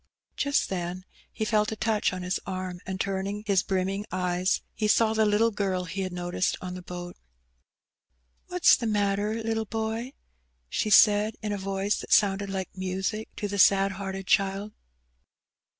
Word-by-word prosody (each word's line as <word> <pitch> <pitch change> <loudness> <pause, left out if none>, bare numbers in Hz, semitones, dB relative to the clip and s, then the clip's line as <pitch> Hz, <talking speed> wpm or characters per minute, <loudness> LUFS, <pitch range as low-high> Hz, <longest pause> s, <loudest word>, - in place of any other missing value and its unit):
Just 285 0 +1
then 180 0 -4 0.3
he 220 - -3
felt 215 0 +1
a - - -3
touch 215 -1 +1
on 185 -1 -5
his 180 +1 -1
arm, 185 -1 -4
and 190 0 -4
turning 195 +2 -2
his 200 -3 +3
brimming 195 +1 -1
eyes, 180 0 0
he 215 - -1
saw 220 +1 +4
the 220 -1 +3
little 215 +2 +3
girl 195 -3 -1
he 185 +2 -4
had 185 -1 -3
noticed 175 0 -1
on 180 -1 -6
the 180 - -7
boat. 175 0 -7 0.7
" - - -46
What's 360 -1 +5
the 235 - -3
matter, 205 0 0
little 225 0 -1
boy? 225 +4 -3 0.3
" 60 0 -45
she 215 - -1
said, 210 +1 +6
in 210 - -2
a - - -2
voioe 195 +1 -1
that - - -9
sounded 200 -1 +3
like 190 -1 -4
music 190 +3 -3
to 205 - -3
the 200 0 -3
sad 195 +1 +5
hearted 195 0 -5
child. 195 +2 +1
195 Hz, 175 wpm, -27 LUFS, 185-210 Hz, 0.7 s, said